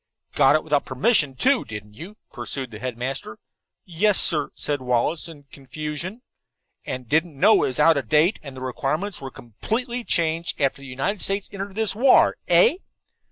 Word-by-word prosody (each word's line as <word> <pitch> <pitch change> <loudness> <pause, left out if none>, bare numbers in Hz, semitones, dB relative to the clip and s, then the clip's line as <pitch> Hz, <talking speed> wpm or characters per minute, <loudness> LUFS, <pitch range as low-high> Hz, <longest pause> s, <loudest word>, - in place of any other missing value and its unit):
"Got - - +5
it 155 - +1
without 150 -2 +1
permission, 140 - +1
too, 265 - +2
didn't 105 -1 -9
you?" 180 - -11 0.2
pursued 130 -3 -4
the 110 - -9
headmaster. 125 -1 -5 0.5
"Yes, 190 +4 +2
sir," 150 -3 +2
said 145 -2 -3
Wallace, 125 +7 0
in 155 -4 -12
confusion. 150 - -6 0.6
"And 125 -1 -5
didn't 160 +1 0
know 220 - +6
that - - +2
it - - 0
was 130 - -3
out 160 0 +5
of 125 -6 -4
date, 155 - +3
and 140 -3 -10
that - - -8
the - - -4
requirements 150 +10 -3
were 135 - -6
completely 225 - -4
changed 165 -3 -1
after 140 0 0
the 140 - -10
United 135 +11 -3
States 195 0 -1
entered 195 0 -6
this 220 -1 +1
war, 250 +5 +5
eh?" 465 -7 +5
150 Hz, 180 wpm, -23 LUFS, 130-195 Hz, 0.6 s, know